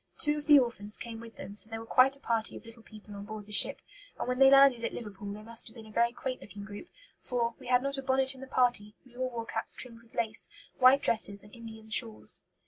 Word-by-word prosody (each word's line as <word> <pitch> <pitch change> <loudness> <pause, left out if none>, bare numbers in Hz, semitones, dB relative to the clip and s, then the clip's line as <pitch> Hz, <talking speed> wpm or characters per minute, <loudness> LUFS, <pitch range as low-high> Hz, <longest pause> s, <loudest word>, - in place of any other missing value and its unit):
Two 295 0 +1
of 295 -1 -5
the 295 -1 +8
orphans 235 -5 +2
came 230 -1 -7
with 230 0 -12
them, 195 +2 -9
so 215 - 0
there 225 0 -6
was 225 - -10
quite 265 +3 +4
a - - -17
party 230 -4 -2
of - - -14
little 230 0 -14
people 215 -2 -14
on 200 0 -8
board 215 -1 -8
the 210 - -14
ship; 205 - +5 0.3
and - - -4
when 250 0 -2
they 270 0 +8
landed 275 -3 +6
at - - -3
Liverpool 205 -3 -8
they 210 +1 -9
must 230 +1 -2
have 220 - -15
been 225 -2 -11
a 215 - -14
very 235 +2 +2
quaint 255 +1 -5
looking 205 -1 -10
group, 205 +9 -10 0.3
for 235 -2 -2
"we - - -12
had 250 0 +3
not 275 0 -1
a - - -4
bonnet 265 0 +3
in 265 - -14
the 265 - -9
party; 245 -5 0
we 245 -1 -20
all 255 0 -2
wore 230 -2 -6
caps 225 0 -2
trimmed 230 -2 -7
with 230 -1 -22
lace, 220 -1 -1 0.3
white 255 +2 +6
dresses, 200 -3 +1
and 205 - -17
Indian 225 -2 -11
shawls." 225 -2 0
230 Hz, 265 wpm, -30 LUFS, 215-255 Hz, 0.3 s, the